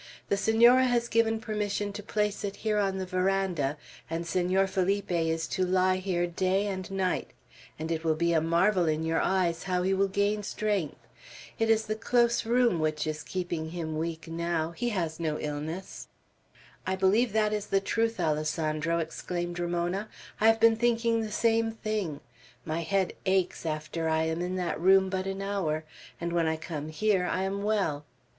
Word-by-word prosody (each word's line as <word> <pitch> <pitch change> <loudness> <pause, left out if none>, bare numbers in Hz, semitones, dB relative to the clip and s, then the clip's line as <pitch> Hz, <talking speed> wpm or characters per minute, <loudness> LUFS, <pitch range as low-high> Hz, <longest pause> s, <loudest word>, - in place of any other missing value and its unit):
"The - - +3
Senora 235 +5 +5
has 240 -1 +1
given 225 -1 +2
permission 210 -2 -2
to 210 - -6
place 210 0 -1
it 200 -1 -3
here 215 -1 0
on 195 -1 0
the 190 - -3
veranda, 185 -6 0 0.3
and 165 +1 -3
Senor 185 +3 +2
Felipe 195 +1 0
is 165 -1 0
to 185 - 0
lie 185 0 +2
here 185 -2 0
day 185 +3 0
and 190 -2 -4
night; 190 -2 -1 0.5
and 160 +2 -4
it 165 0 -2
will 160 -1 +2
be 170 +1 +1
a 160 - +3
marvel 170 +3 +2
in 155 0 0
your 160 0 +1
eyes 175 -3 +1
how 180 -1 0
he 190 +1 +2
will 195 +1 +2
gain 200 +2 0
strength. 205 -5 -2 0.6
It 225 0 +2
is 220 0 +3
the 215 - -1
close 235 +1 +1
room 240 -6 +3
which 155 -1 0
is 155 0 -3
keeping 170 -1 -3
him 160 -2 -4
weak 165 +1 -4
now; 165 0 -1
he 240 +8 -2
has 170 -7 -2
no 155 -2 -1
illness." 155 +5 -5 0.8
"I 190 - +1
believe 200 +5 +3
that 215 -1 +2
is 210 -1 -2
the 195 - +2
truth, 225 +3 -1
Alessandro," 155 +1 0
exclaimed 175 +1 -3
Ramona; 175 +4 -1 0.3
"I 220 - +4
have 225 0 +5
been 225 0 +5
thinking 230 -1 +2
the 215 -1 -4
same 225 +1 +2
thing. 215 -9 -3 0.4
My 160 +1 -2
head 190 +3 0
aches 185 -3 +1
after 155 +1 -2
I 160 0 +2
am 160 +1 -1
in 180 +1 -2
that 180 -2 -2
room 190 +1 +5
but 190 0 -2
an 195 0 -3
hour, 175 -6 -1 0.4
and 170 0 -3
when 170 -1 +2
I 160 0 0
come 155 -2 -5
here 190 +2 +1
I 185 - 0
am 195 +1 -2
well. 200 -9 0
185 Hz, 185 wpm, -28 LUFS, 165-210 Hz, 0.8 s, Senora